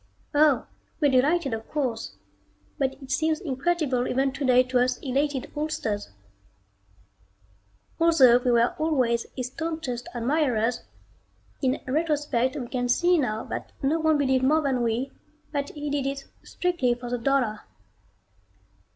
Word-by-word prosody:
Oh, 290 -4 +4 0.3
we're 290 -4 +3
delighted 275 +2 +2
of 225 0 -5
course, 250 -7 -3 0.6
but 270 -1 0
it 265 - -9
seems 315 +3 +1
incredible 280 -3 0
even 270 +1 +1
today 255 -2 +3
to 255 0 0
us 250 0 +1
elated 275 0 -2
oldsters. 230 -9 -2 1.9
Although 275 -8 +6
we 250 - -1
were 235 0 +3
always 255 -7 +1
his 255 - -2
staunchest 315 -7 -4
admirers, 245 -2 +1 0.8
in 260 -1 0
retrospect 290 -3 0
we 255 -5 -4
can 245 0 -2
see 350 +7 +3
now 220 -5 -1
that - - -6
no 300 +5 +2
one 315 -1 +3
believed 265 -2 +2
more 305 +4 +3
than 265 -3 0
we 240 +3 -1 0.4
that 285 -2 -2
he 295 -1 -5
did 280 -2 0
it 275 0 -4 0.2
strictly 345 -10 0
for 245 0 -8
the 245 - -1
dollar. 245 -4 +1
265 Hz, 135 wpm, -26 LUFS, 245-300 Hz, 1.9 s, Although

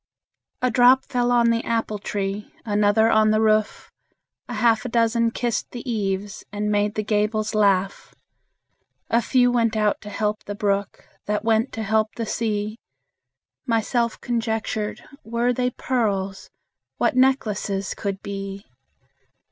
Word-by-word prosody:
A 255 - +3
drop 250 +3 +5
fell 245 -1 0
on 235 -1 +4
the 230 0 0
apple 225 -2 -1
tree, 200 0 -4
Another 210 +1 +3
on 215 0 +4
the 215 0 +3
roof; 215 -1 +1 0.6
A - - -4
half 230 -2 +3
a 250 - -4
dozen 230 0 +2
kissed 235 0 -2
the 245 +1 -8
eaves, 200 -3 -2
And 210 0 -2
made 205 0 +1
the 215 - -1
gables 215 +1 0
laugh. 195 -2 +1 1.0
A 235 - +4
few 245 0 +3
went 230 -2 +1
out 210 -1 +1
to 210 - -9
help 210 0 -2
the 205 - -5
brook, 200 -1 -2 0.2
That 210 0 -1
went 225 +3 +2
to 225 - -3
help 215 +1 0
the 230 - -3
sea. 215 0 -2 0.9
Myself 235 0 0
conjectured, 225 -2 -2 0.2
Were 235 +2 0
they 250 +1 0
pearls, 200 -7 -2 0.5
What - - +1
necklaces 215 -7 +1
could 195 -2 -4
be! 195 0 -6
215 Hz, 140 wpm, -23 LUFS, 205-235 Hz, 1.0 s, drop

